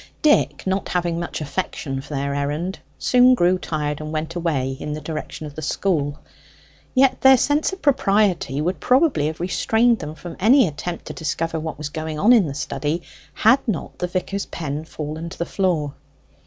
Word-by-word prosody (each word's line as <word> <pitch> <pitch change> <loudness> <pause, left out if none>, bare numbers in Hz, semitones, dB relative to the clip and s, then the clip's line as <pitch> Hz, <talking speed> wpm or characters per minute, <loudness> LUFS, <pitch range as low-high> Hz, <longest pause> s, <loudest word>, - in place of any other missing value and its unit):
Dick, 300 -1 +3
not 190 +1 -1
having 175 -2 0
much 170 -2 -4
affection 140 -3 -3
for - - -15
this 140 +1 -1
errand, 150 +7 -2 0.2
soon 250 0 +5
grew 180 -3 +3
tired, 150 -3 -3
and 155 0 -5
went 160 +1 -3
away 145 -7 -1
in 150 - -4
the 155 - -4
direction 155 0 -6
of 145 - -8
the 155 - -7
school. 150 -3 0 0.8
Yet 260 0 +4
their 265 0 +8
sense 290 +6 +1
of 380 - -9
propriety 200 - +2
would 180 +4 -1
probably 255 - +3
have 155 +1 -5
restrained 225 +6 +2
them 150 +1 -6
from 165 +2 -9
any 240 +4 +6
attempt 170 +3 -5
to - - -6
discover 165 0 -2
what 160 0 -5
was 150 -1 -5
going 155 0 -4
on 215 +10 +5
in 215 -8 +5
the 140 - -5
study 155 +3 -2 0.3
had 255 +5 +5
not 205 -8 -3
the 180 - -1
vicar's 190 +2 -3
pen 150 -1 -4
fallen 155 +1 -6
to - - -10
the 170 - -2
floor. 170 -7 0
170 Hz, 185 wpm, -22 LUFS, 150-200 Hz, 0.8 s, their